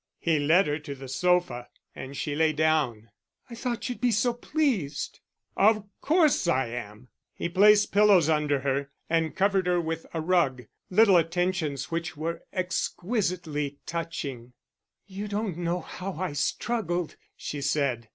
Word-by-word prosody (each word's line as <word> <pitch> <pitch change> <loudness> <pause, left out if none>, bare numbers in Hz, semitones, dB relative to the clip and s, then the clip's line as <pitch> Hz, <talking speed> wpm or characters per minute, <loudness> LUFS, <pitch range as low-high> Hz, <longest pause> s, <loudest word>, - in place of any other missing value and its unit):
He 160 -3 +1
led 165 +7 +4
her 150 +1 -1
to 145 -2 -7
the 135 0 -9
sofa, 130 -4 +1 0.3
and 135 +1 -7
she 150 - -2
lay 155 +1 +2
down. 145 -8 0 0.4
"I - - -6
thought 235 0 -3
you'd 245 - -5
be 250 - +3
so 235 +2 +2
pleased." 240 - -1 0.4
"Of 215 +1 +3 0.2
course 305 - +3
I 130 -7 +1
am!" 115 0 -8 0.3
He - - -2
placed 205 +4 +5
pillows 200 -5 +5
under 150 -3 +1
her, 140 +1 -1 0.2
and 165 -1 +1
covered 195 -1 +2
her 180 -1 +2
with 165 -1 -3
a 165 - -3
rug 155 -7 +1 0.3
little 195 -1 +6
attentions 165 -4 -1
which 165 -2 -3
were 165 +2 -3
exquisitely 175 - -2
touching. 140 -8 -5 0.5
"You 200 +1 -6
don't 205 -3 -2
know 175 +1 -1
how 190 +4 -6
I 180 -1 -3
struggled," 175 - -1 0.2
she 145 - -5
said. 135 -5 0
165 Hz, 150 wpm, -27 LUFS, 145-195 Hz, 0.5 s, little